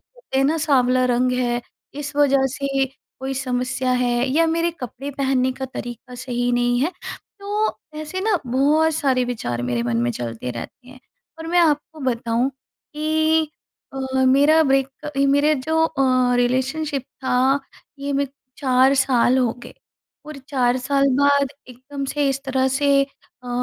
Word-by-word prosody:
कहते - - -6
हैं 270 - +3
ना 305 +4 +2
साँवला 255 -5 +3
रंग 250 0 +2
है, 245 -1 0 0.3
इस 295 0 -6
वजह 275 -2 +4
से 275 0 -1 0.4
कोई 265 +1 -3
समस्या 255 0 -1
है, 245 0 +1
या 325 +5 +3
मेरे 335 +1 +1
कपड़े 260 +3 -6
पहनने 265 -2 0
का 265 +1 -6
तरीका 245 -1 -8
सही 245 -1 -2
नहीं 245 0 +2
है, 300 +6 +1 0.5
तो 415 +2 -1 0.2
ऐसे 310 +5 -5
ना 425 0 +2
बहुत 295 +6 +2
सारे 265 -4 +1
विचार 120 - -3
मेरे 120 -1 -1
मन 120 -1 -1
में 120 - +1
चलते 120 0 -5
रहते 125 - -9
हैं। 255 0 -14 0.4
और 325 - -7
मैं 350 +2 +1
आपको 310 -1 +1
बताऊँ 240 -1 0 0.5
कि 315 0 +1 0.4
अ, 270 - -6 0.3
मेरा 285 +5 +5
ब्रेक 270 +1 0 0.2
मेरे 285 +2 +3
जो 315 +4 0
अ, 255 -4 +2
रिलेशनशिप 265 +3 0 0.2
था 260 +2 +2 0.4
ये 280 +1 -3
मैं 280 0 +1 0.3
4 260 0 +4
साल 260 -1 +3
हो 245 -3 +2
गए। - - -11 0.5
और 305 -1 -8
4 250 -3 +2
साल 275 +2 +1
बाद 285 -1 +3 0.2
एकदम 260 +3 -7
से 285 +1 0
इस 270 0 -2
तरह 265 -1 +1
से 275 +1 +3
अ, 260 -2 -18
265 Hz, 155 wpm, -21 LUFS, 250-290 Hz, 0.5 s, मेरा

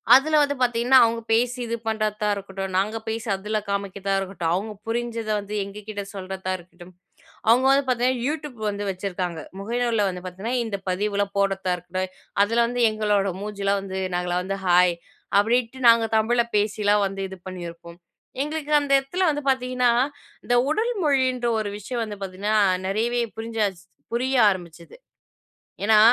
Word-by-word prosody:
அதுல 305 +4 +4
வந்து 285 0 0
பார்த்திங்கன்னா, 245 +1 +5
அவங்க 230 0 -1
பேசி 245 +2 +2
இது 230 - -1
பண்ணுறதா 215 -1 0
இருக்கட்டும், 195 -1 -5
நாங்க 210 +4 0
பேசி 225 +2 -3
அதுல 210 +3 -2
காமிக்கிறதா 200 0 -2
இருக்கட்டும், 185 -4 -2
அவங்க 200 +5 -2 0.2
புரிஞ்சத 230 -1 -2
வந்து 205 +1 -7
எங்ககிட்ட 205 +1 -7
சொல்றதா 190 0 -4
இருக்கட்டும், 175 0 -15 0.6
அவங்க 250 +3 +5
வந்து 275 +1 +4
பார்த்திங்கன்னா, 250 0 +1
யூடியூப் 295 -4 -4
வந்து 205 0 -4
வச்சுருக்காங்க. 180 -3 -4 0.2
முகநூலுல 230 0 0
வந்து 180 -1 -6
பார்த்திங்கன்னா, 190 +7 -4
இந்த 210 -3 -3
பதிவுலாம் 200 +1 -1
போடுறதா 195 -2 +1
இருக்கட்டும், 185 +2 -4 0.3
அதுல 230 +3 +1
வந்து 245 +1 -2
எங்களோட 210 -2 +1
மூஞ்சிலா 200 -1 -1
வந்து, 190 -1 -5 0.2
நாங்கலாம் 180 0 -1
வந்து 195 +1 -3
ஹாய் 180 0 +5 0.4
அப்டின்ட்டு 235 +4 +1
நாங்க 230 0 +5
தமிழ்ல 235 +2 +3
பேசிலாம் 205 0 +2
வந்து 195 0 -6
இது 190 - -8
பண்ணியிருப்போம். 170 -2 -8 0.4
எங்களுக்கு 300 +1 -3
அந்த 285 - -4
இடத்துல 355 +8 -1
வந்து 295 - -3
பார்த்திங்கன்னா, 255 -1 +2 0.5
இந்த 245 - +2
உடல் 445 +10 +1
மொழின்ற 260 -4 +2
ஒரு 210 -1 -2
விஷயம் 235 +4 -4
வந்து 210 -2 -6
பார்த்திங்கன்னா 195 +3 -2 0.3
நிறையவே 230 +5 0 0.2
புரிஞ்சாச்சு 220 -5 -2 0.3
புரிய 260 +3 0
ஆரம்பிச்சிது. 175 - -6 0.9
ஏன்னா, 215 +1 +5
210 Hz, 145 wpm, -24 LUFS, 195-240 Hz, 0.9 s, பார்த்திங்கன்னா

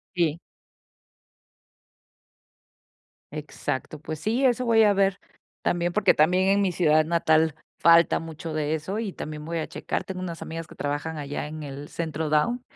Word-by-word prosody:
Sí. 165 -3 +1 2.9
Exacto. 150 -1 -4
Pues 155 0 -6
sí, 225 - 0
eso 250 0 +2
voy 225 -1 +5
a 205 -1 +5
ver, 195 0 +2 0.5
también, 175 0 0
porque 210 - +4
también 180 +5 +3
en 200 +1 +4
mi 195 -2 +2
ciudad 155 -3 +3
natal 160 -1 +3 0.3
falta 170 0 +6
mucho 165 0 -7
de 155 0 -1
eso 185 +7 -4
y 210 -5 -3
también 150 0 -7
voy 165 +1 -2
a 155 - -3
checar. - - -3
Tengo 185 -1 -6
unas 170 -3 -5
amigas 165 0 -6
que - - -14
trabajan 145 +3 -3
allá 145 0 -4
en 155 +1 -7
el 145 +1 -8
Centro 160 -2 -3
Down, 195 +12 +2
165 Hz, 160 wpm, -25 LUFS, 155-185 Hz, 2.9 s, falta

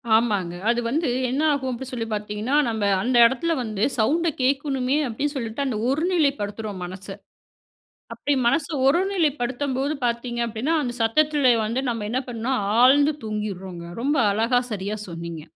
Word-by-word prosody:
ஆமாங்க. 205 -6 +1 0.2
அது 240 - +2
வந்து 300 +4 0 0.2
என்ன 265 +4 -1
ஆகும் 265 -2 -1
அப்பிடி 250 +2 -6
சொல்லி 230 -3 -3
பார்த்தீங்கன்னா, 210 +5 -2
நம்ப 220 -2 -2 0.2
அந்த 250 +1 0
இடத்தில 265 +8 +1
வந்து 215 -2 -3 0.2
சவுண்ட்‌ 330 +9 +2
கேக்கணுமே 270 0 +1
அப்பிடின்னு 280 +6 -3
சொல்லிட்டு, 230 +2 -3
அந்த 240 -5 -2
ஒரு 285 +4 0
நிலைப்படுத்துறோம் 215 - -1
மனச. 185 +2 -9 1.1
அப்பிடி 290 - -1
மனச 280 +4 +2 0.2
ஒருநிலைப்படுத்தம்போது 285 -5 0
பார்த்தீங்க 235 0 -2
அப்பிடின்னா, 235 +9 -1
அந்த 240 -2 -3
சத்தத்தில 285 +2 +3
வந்து 240 +5 -1
நம்ம 225 -3 -3
என்ன 255 +2 0
பண்ணோம்ணா, 240 +2 -2 0.3
ஆழ்ந்து 285 +4 +5
தூங்கிங்றோங்க. 190 -5 -5 0.2
ரொம்ப 290 +4 +1
அழகா 230 +4 +2
சரியா 205 +1 -3
சொன்னீங்க. 170 -1 -7
245 Hz, 145 wpm, -23 LUFS, 215-280 Hz, 1.1 s, ஆழ்ந்து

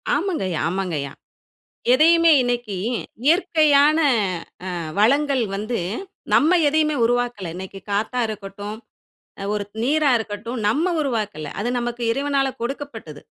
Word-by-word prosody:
ஆமாங்கய்யா 290 - -1
ஆமாங்கய்யா. 170 -7 -3 0.8
எதையுமே 330 +5 +5
இன்னைக்கு 240 -4 -2 0.5
இயற்கையான 310 -3 +4 0.8
அ - - -3 0.2
வளங்கள் 275 +3 +3
வந்து, 215 +4 -2 0.5
நம்ம 335 +5 +5
எதையுமே 305 0 +2
உருவாக்கல. 245 -6 -1
இன்னைக்கு 190 +1 -8
காத்தா 215 +5 -1
இருக்கட்டும், 205 0 -7 0.6
அ - - -4
ஒரு 205 -1 -2 0.2
நீரா 295 +3 +2
இருக்கட்டும், 220 +3 -5
நம்ம 320 +11 +1
உருவாக்கல. 215 - -3
அது 225 - -1
நமக்கு 240 0 -4
இறைவனால 275 +1 0
கொடுக்கப்பட்டது. 235 - -6
245 Hz, 110 wpm, -22 LUFS, 205-290 Hz, 0.8 s, எதையுமே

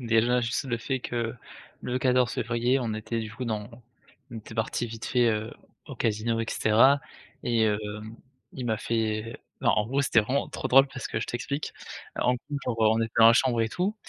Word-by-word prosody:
déjà, 120 +1 +2
juste 120 +4 -1
le 120 -3 -1
fait 130 +2 -2
que 120 -1 -3 0.5
le 125 +1 -1
14 125 -1 +2
février, 120 +3 +1
on 115 -4 -2
était 110 +2 -3
du 110 -1 -6
coup 125 +2 -5
dans 110 -1 -3 0.6
on 115 - -7
était 110 +1 -11
partis 115 +1 -1
vite 115 0 -7
fait, 125 -2 +2
heu, 110 +1 -1 0.3
au - - -8
casino 115 +1 0
et 115 - -2
cetera 130 +6 +4 0.4
et 115 -2 +2
heu, 105 -1 +1 0.7
il 125 -2 -5
m'a 110 -2 +1
fait 110 0 -2 0.2
non, - - +4
en 105 - +1
gros, 135 +4 0
c'était 120 -5 +4
vraiment 130 +6 -1
trop - - -4
drôle 135 +2 +7
parce 130 -3 -6
que 110 - -3
je - - -3
t'explique: 140 +5 -4 0.4
en 125 - +2
gros, 140 +4 -5
genre, 120 -2 -2 0.2
on - - +1
était 115 0 -2
dans 115 - +9
la 115 - +9
chambre 120 -2 +2
et 110 - +1
tout, 185 - -1
115 Hz, 210 wpm, -27 LUFS, 110-125 Hz, 0.7 s, dans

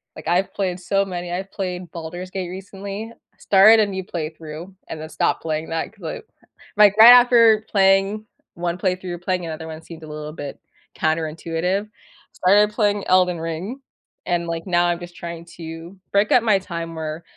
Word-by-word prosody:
like, - - -10
I've 180 +3 +1
played 185 -2 -2
so 195 +2 0
many. 175 -2 -5
I've 190 +2 -4
played 180 -3 -5
Baldur's 175 +2 -7
Gate 185 -2 -4
recently. 195 +3 -7 0.3
Started 210 +3 +6
a - - +4
new 190 -1 -4
playthrough 160 +1 -7 0.2
and 160 - -6
then 155 - -7
stopped - - 0
playing 155 0 -3
that 165 +5 -3
'cause, 205 -4 -19
I 160 - -5 0.6
like, 205 -1 +6
right 225 +2 +11
after 235 -3 +6
playing 195 +2 +3 0.3
1 175 0 -2
playthrough, 180 -2 -2
playing 180 -1 -1
another 160 0 -6
one 160 0 -8
seemed 165 -1 -12
a - - -9
little 150 0 -7
bit 145 -3 -7 0.4
counterintuitive. 165 +5 -1 0.5
Started 205 +3 +4
playing 205 -2 0
Elden 180 -2 +3
Ring, 170 +11 -5 0.4
and, 175 -1 -1
like, 165 0 -4
now 175 -1 +3
I'm 175 -1 0
just 175 0 -10
trying 170 -1 -7
to 165 +2 -9 0.2
break 200 +1 +3
up 245 - +6
my 215 -4 +4
time 170 -3 -6
where, 160 +1 -5
180 Hz, 175 wpm, -21 LUFS, 165-195 Hz, 0.6 s, right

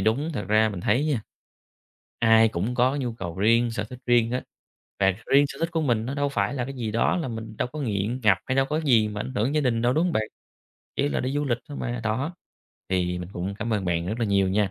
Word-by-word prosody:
đúng, 120 +11 +1
thật 105 - -3
ra 110 +1 +4
mình 100 -4 -5
thấy 120 +10 +2
nha, 135 -8 0 1.0
ai 115 -1 +6
cũng 105 +7 -2
có 130 +3 +2
nhu 125 -4 -2
cầu 90 -5 -6
riêng, 115 +3 +3
sở 105 -1 -3
thích 125 +3 -10
riêng 120 -2 +4
á, 125 - -1 0.6
và 95 -1 +4
riêng 140 +1 +5
sở 135 - -8
thích 165 +1 0
của 165 - +1
mình 115 -6 +1
nó 135 - -3
đâu 145 0 0
phải 105 -4 -1
là 125 -3 -1
cái 135 +2 -6
gì 115 -4 -3
đó, 115 - +2
là 165 -6 -2
mình 110 -2 -6
đâu - - 0
có 155 - -5
nghiện 115 0 -1
ngập 100 -4 +5
hay 130 - 0
đâu 135 - +4
có 150 - -1
cái 155 - -6
gì 110 -2 +5
mà 105 0 -5
ảnh 130 - -4
hưởng 120 +7 0
gia 150 - +3
đình 120 -4 +1
đâu, 120 +1 +3
đúng 160 +5 +2
hông 180 - 0
bạn? 110 - +1 0.7
Chỉ 140 +1 +1
là - - -1
đi 130 +1 -2
du 145 +1 0
lịch 120 -4 0
thôi 145 - -7
mà, 120 -1 -3
đó. 130 +10 -1 0.5
Thì 90 -1 0
mình 90 -1 -6
cũng 95 +2 -4
cảm 115 0 -2
ơn 100 -3 -1
bạn 85 -1 0
rất 110 +5 -3
là 115 - +1
nhiều 100 -2 +2
nha, 100 0 +1
115 Hz, 275 wpm, -25 LUFS, 105-135 Hz, 1.0 s, ai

